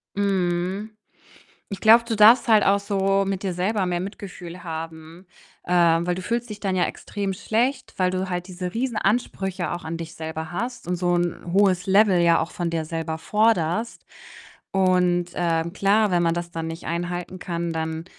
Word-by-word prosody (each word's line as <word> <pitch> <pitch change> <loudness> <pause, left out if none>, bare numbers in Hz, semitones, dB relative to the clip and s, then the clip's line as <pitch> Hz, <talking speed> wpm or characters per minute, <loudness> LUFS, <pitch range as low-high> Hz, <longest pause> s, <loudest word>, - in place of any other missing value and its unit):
Mhm. 190 +1 -1 0.8
Ich 200 - -6
glaube, 230 +2 +7
du 230 - -1
darfst 220 +4 +7
halt 215 -3 +5
auch 200 +1 +4
so 195 -1 +1
mit 195 0 -2
dir 190 -2 -2
selber 190 +2 0
mehr 175 -1 -1
Mitgefühl 180 -2 -8
haben, 165 +1 -8 0.4
ähm, 170 -1 +3
weil 180 - +1
du 185 - -6
fühlst 235 +4 -2
dich 210 -1 -8
dann 190 -2 -1
ja 180 - +3
extrem 200 -1 -4
schlecht, 250 +7 -1
weil 185 -2 +2
du 185 0 -2
halt 180 0 -3
diese 180 -1 -5
Riesenansprüche 215 -6 -1
auch 175 - -5
an 165 +1 -4
dich 165 0 -7
selber 160 0 -6
hast 240 +2 -4
und 180 - -1
so 175 0 0
'n 175 0 -2
hohes 190 -2 +3
Level 195 -2 +4
ja 170 -1 +4
auch 165 - -4
von 175 -2 -2
dir 165 -1 -2
selber 160 0 -4
forderst 215 +1 0 0.7
und, 180 -2 +2
ähm, 170 -1 0
klar, 205 +1 +2
wenn 175 -1 +3
man 165 0 +2
das 170 0 -4
dann 165 0 -4
nicht 165 +1 -7
einhalten 175 +2 -4
kann, 170 -1 -3
dann 160 0 -3
180 Hz, 180 wpm, -23 LUFS, 170-200 Hz, 0.8 s, glaube